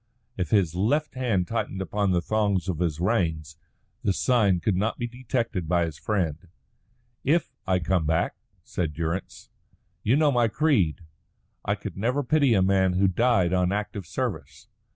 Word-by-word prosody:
If 90 Hz, -4 st, -2 dB
his 90 Hz, -5 st, +2 dB
left 120 Hz, -, 0 dB
hand 115 Hz, -9 st, 0 dB
tightened 115 Hz, -4 st, -3 dB
upon 100 Hz, +2 st, -1 dB
the 90 Hz, -2 st, +1 dB
thongs 100 Hz, -4 st, 0 dB
of 90 Hz, -4 st, -2 dB
his 80 Hz, -3 st, -1 dB
reins, 80 Hz, -6 st, 0 dB, 0.5 s
the 100 Hz, -, +2 dB
sign 105 Hz, -6 st, +2 dB
could 100 Hz, +2 st, 0 dB
not 105 Hz, +5 st, 0 dB
be 120 Hz, -, -2 dB
detected 120 Hz, -7 st, -3 dB
by 85 Hz, -1 st, +3 dB
his 80 Hz, -2 st, -7 dB
friend. 90 Hz, -5 st, -2 dB, 0.8 s
"If 165 Hz, +5 st, +1 dB
I 95 Hz, -1 st, +3 dB
come 85 Hz, -2 st, 0 dB
back," 80 Hz, +2 st, +1 dB, 0.3 s
said 80 Hz, -4 st, -3 dB
Durrance. 85 Hz, +4 st, -4 dB, 0.5 s
"You 115 Hz, -, +2 dB
know 150 Hz, 0 st, +4 dB
my 120 Hz, -3 st, +3 dB
creed. 110 Hz, -, +1 dB, 0.6 s
I -, -, 0 dB
could -, -, -8 dB
never 125 Hz, +8 st, 0 dB
pity 140 Hz, -3 st, +3 dB
a 95 Hz, -, +4 dB
man 95 Hz, -1 st, +3 dB
who 95 Hz, +2 st, +3 dB
died 95 Hz, -3 st, +2 dB
on 90 Hz, 0 st, +2 dB
active 100 Hz, -3 st, -3 dB
service. 85 Hz, -, -5 dB
95 Hz, 165 wpm, -26 LUFS, 85-115 Hz, 0.8 s, know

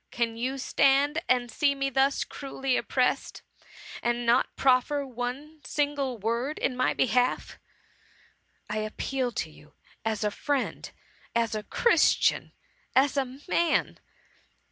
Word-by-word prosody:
Can 230 Hz, -1 st, -1 dB
you 255 Hz, +4 st, -2 dB
stand 280 Hz, +4 st, +2 dB
and 245 Hz, -2 st, +2 dB
see 280 Hz, +4 st, +2 dB
me 275 Hz, 0 st, -1 dB
thus 270 Hz, +1 st, +2 dB
cruelly 270 Hz, -2 st, -3 dB
oppressed, 250 Hz, 0 st, 0 dB, 0.6 s
and 240 Hz, 0 st, -1 dB
not 235 Hz, +2 st, +2 dB
proffer 270 Hz, +2 st, +2 dB
one 265 Hz, +5 st, -6 dB
single 285 Hz, -2 st, -1 dB
word 235 Hz, +7 st, -2 dB
in 255 Hz, -, -1 dB
my 255 Hz, 0 st, +1 dB
behalf? 250 Hz, 0 st, +1 dB, 1.1 s
I 210 Hz, -, -3 dB
ap^ 215 Hz, 0 st, -5 dB
peal 260 Hz, -2 st, -1 dB
to 160 Hz, -, -3 dB
you 150 Hz, 0 st, -19 dB, 0.3 s
as 220 Hz, -1 st, -1 dB
a 210 Hz, -, +1 dB
friend, 285 Hz, +4 st, -2 dB, 0.5 s
as 230 Hz, -2 st, +1 dB
a 215 Hz, -, -2 dB
christian, 470 Hz, -, +2 dB, 0.4 s
as 270 Hz, +2 st, +4 dB
a 265 Hz, -1 st, -2 dB
man.' 340 Hz, -1 st, +1 dB
255 Hz, 130 wpm, -27 LUFS, 235-275 Hz, 1.1 s, as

